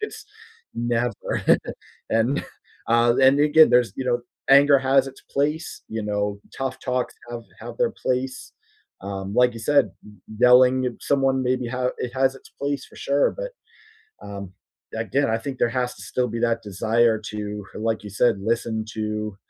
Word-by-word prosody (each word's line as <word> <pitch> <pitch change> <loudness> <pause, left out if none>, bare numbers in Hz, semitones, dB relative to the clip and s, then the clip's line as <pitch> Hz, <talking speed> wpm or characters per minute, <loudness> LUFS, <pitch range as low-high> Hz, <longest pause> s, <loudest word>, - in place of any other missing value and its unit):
It's 435 0 -6 0.5
Never, 120 -1 -2 0.7
and 115 +5 +2 0.5
uh, 115 +1 +4
and 135 +2 +6
again, 150 +1 +6
there's, 125 -1 +4
you 130 - -3
know 120 -1 +1 0.3
anger 140 0 +7
has 135 0 +3
its 135 - -10
place, 150 +3 -2
you 110 0 -4
know, 105 -1 -2 0.2
tough 135 -1 -3
talks 125 -1 -2 0.2
have 120 -1 -6 0.2
have - - -8
their 485 -1 +2
place, 130 +1 -2 0.5
um, 100 0 -5
like 125 0 +4
you 115 - -8
said, 145 +4 +3
y 105 - -13 0.3
yelling 125 +1 +6
at 125 - -1
someone, 135 -1 +1
maybe, 125 -1 0
ha 125 +1 -1
it 125 - -4
has 135 0 +2
its 135 - -15
place, 140 -1 -3
for - - -18
sure, 140 +1 +1
but, - - -4 0.8
um, 100 -2 -7 0.4
again, 115 +4 0
I 115 - +1
think 135 +2 -5
there - - +3
has 125 0 -2
to - - -12
still 125 -1 -1
be 115 +1 -4
that 115 -1 +1
desire 110 +3 +2
to 105 -1 -5
h - - -7
like 110 -1 -1
you 105 - -7
said, 120 - +5
listen 110 +1 -1
to 105 -1 -3
125 Hz, 170 wpm, -23 LUFS, 110-135 Hz, 0.8 s, anger